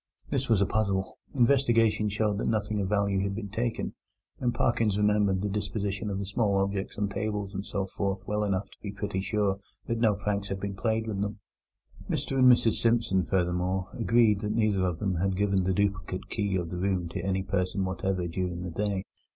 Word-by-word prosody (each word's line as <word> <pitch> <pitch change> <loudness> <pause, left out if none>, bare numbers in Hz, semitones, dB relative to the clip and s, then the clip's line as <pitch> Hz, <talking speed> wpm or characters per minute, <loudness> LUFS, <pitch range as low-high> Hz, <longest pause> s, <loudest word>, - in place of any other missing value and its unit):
This 135 -2 0
was 110 -4 +4
a - - +5
puzzle. 100 -2 -1 0.2
Investigation 120 -5 +3
showed 105 0 0
that - - -1
nothing 105 -1 0
of 95 - -2
value 100 -2 +2
had 100 0 -1
been 100 -2 -5
taken, 115 +3 -2 0.5
and 125 -1 +1
Parkins 115 -4 +1
remembered 105 -2 +2
the - - +1
disposition 105 0 -2
of 100 - -2
the 100 - -3
small 100 0 +1
objects 95 0 -1
on 105 0 +1
tables 100 0 -3
and 95 0 -3
so 100 -1 -2
forth 95 0 -2
well 105 0 0
enough 100 -1 0
to - - -17
be 100 - -5
pretty 100 -2 -3
sure 100 -1 0 0.3
that 115 0 -1
no 110 -3 +4
pranks 100 0 -2
had 95 -1 -3
been 100 0 -3
played 110 +2 0
with 105 -3 -3
them. 105 +1 -2 0.7
Mr 135 - 0
and 130 -1 +8
Mrs 115 -2 +3
Simpson 115 -5 +3
furthermore 90 +1 0
agreed 115 -4 +3
that 105 0 -1
neither 110 -4 +2
of 90 -2 -2
them 95 -2 -1
had 95 +2 0
given 100 -2 +2
the 95 - +2
duplicate 95 -1 -1
key 100 -3 0
of 85 -3 -2
the 90 - -3
room 95 -2 0
to 85 - -4
any 95 0 0
person 95 0 0
whatever 95 -1 -1
during 90 0 -3
the 90 - -4
day. 100 +1 -1
100 Hz, 205 wpm, -28 LUFS, 95-105 Hz, 0.7 s, and